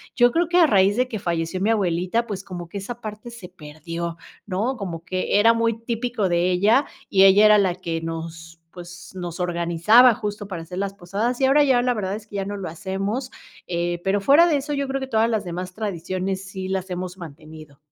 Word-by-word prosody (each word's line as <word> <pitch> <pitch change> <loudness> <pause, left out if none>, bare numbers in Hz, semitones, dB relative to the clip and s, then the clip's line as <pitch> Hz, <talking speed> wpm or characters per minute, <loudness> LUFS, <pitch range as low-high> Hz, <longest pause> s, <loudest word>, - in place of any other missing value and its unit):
yo 245 0 +5
creo 340 +3 +1
que 355 - +2
a 345 - +7
raíz 200 -5 +3
de 255 0 +2
que 220 -4 -5
falleció 170 +1 -2
mi 210 - +1
abuelita, 185 +1 0
pues, 200 -4 -6
como 175 -3 -8
que 200 - -5
esa 240 +5 -7
parte 215 +2 -7
se 230 -7 -11
perdió, 165 +3 -7 0.3
¿no? 215 +8 -1
Como 170 -6 -6
que 185 +2 0
era 225 +2 +6
muy 230 -1 0
típico 230 -2 -2
de 175 +1 +1
ella, 215 +10 +3 0.2
y 195 0 +5
ella 200 +2 +7
era 210 0 +7
la 185 -3 +1
que 165 -3 -4
nos, 165 0 -7 0.2
pues, 175 0 -11
nos 175 -1 -6
organizaba 175 +8 +4
justo 205 -1 -5
para 175 -4 -6
hacer 170 +2 -9
las 195 0 -2
posadas, 205 +7 -3
y 265 - +5
ahora 285 +2 +5
ya 260 -4 +3
la 250 0 +1
verdad 200 -3 -3
es 215 0 -10
que 205 - -11
ya 195 - -2
no 205 +1 -4
lo 185 -4 -5
hacemos, 195 +8 -4 0.4
eh, 175 0 -2
pero 195 +1 +1
fuera 300 +10 +6
de 300 -4 +2
eso 290 +2 -4
yo 280 -1 -2
creo 270 0 -2
que 265 - -4
todas 225 -1 +2
las 220 -3 -1
demás 180 +1 -6
tradiciones 190 -1 -3
sí 190 0 -6
las 190 0 -3
hemos 180 0 -5
mantenido. 155 -3 -12
195 Hz, 220 wpm, -23 LUFS, 175-230 Hz, 0.4 s, a